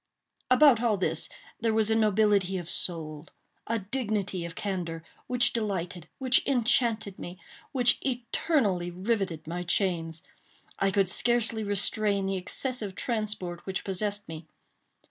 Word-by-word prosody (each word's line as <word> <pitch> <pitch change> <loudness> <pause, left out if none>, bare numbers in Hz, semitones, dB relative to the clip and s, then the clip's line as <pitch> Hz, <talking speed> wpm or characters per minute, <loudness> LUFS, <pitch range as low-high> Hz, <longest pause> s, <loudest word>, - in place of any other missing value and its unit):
About 255 -2 +6
all 225 -4 +2
this 165 -4 -1 0.3
there 225 -1 +1
was 220 0 +2
a - - +3
nobility 210 -3 +3
of 175 -2 -6
soul—a 160 +6 0
dignity 205 -4 -2
of 170 - -7
candor—which 190 +6 -2
delighted—which 200 - -1
enchanted 235 -5 +1
me—which 240 +7 -2
eternally 235 - 0
riveted 185 -2 -2
my 175 +3 -4
chains. 170 -3 -1 0.6
I 195 - +3
could 195 0 +2
scarcely 235 -1 +2
restrain 205 0 +1
the 195 0 -1
excessive 205 +2 -2
transport 210 -7 -3
which 190 0 -2
possessed 205 +1 -1
me. 160 0 -8
205 Hz, 115 wpm, -28 LUFS, 180-230 Hz, 0.6 s, About